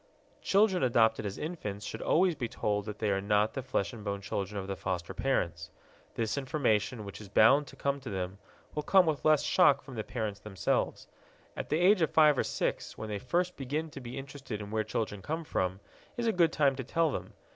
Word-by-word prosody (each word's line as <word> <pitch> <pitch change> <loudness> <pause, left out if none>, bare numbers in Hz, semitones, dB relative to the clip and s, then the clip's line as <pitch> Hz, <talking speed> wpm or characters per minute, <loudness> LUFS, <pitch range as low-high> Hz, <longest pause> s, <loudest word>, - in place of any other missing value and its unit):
Children 195 -2 +3
adopted 110 -4 +3
as 100 - -6
infants 105 - -5
should - - -6
always 180 +2 +3
be 125 -6 -3
told 105 -2 -1
that 105 -1 -6
they 105 -1 0
are 95 0 +1
not 105 +1 +2
the 135 - -3
flesh 110 -4 -1
and 110 -3 -9
bone 100 -1 -2
children 100 0 -3
of 95 - -5
the 95 0 -3
foster 90 -1 -3
parents. 85 -8 -1 0.5
This 115 +4 -1
information, 120 -6 0
which 100 +2 -8
is 100 - -11
bound 135 +8 +5
to - - -12
come 140 0 -1
to 130 -3 -8
them, 95 0 -4 0.3
will 150 - -1
come 190 +4 +5
with 155 -5 -1
less 155 -1 +4
shock 145 -7 +4
from 130 -1 -11
the 110 -3 -3
parents 110 -4 -4
themselves. 100 -2 -1 0.5
At - - -5
the 155 - +2
age 185 +3 +5
of 160 - +3
five 150 -2 +5
or - - +1
six, - - -2
when 110 - -6
they 105 -1 -3
first 175 - 0
begin 150 +4 -3
to 140 - -8
be 125 +2 -7
interested 135 -5 -6
in 105 0 -7
where 110 0 0
children 105 -2 -3
come 160 - -3
from, 95 - -1 0.4
is 240 - -1
a 225 - +3
good 170 -3 +4
time 140 -4 +3
to 130 - -3
tell 160 +5 +1
them. - - -5
120 Hz, 220 wpm, -30 LUFS, 105-150 Hz, 0.5 s, bound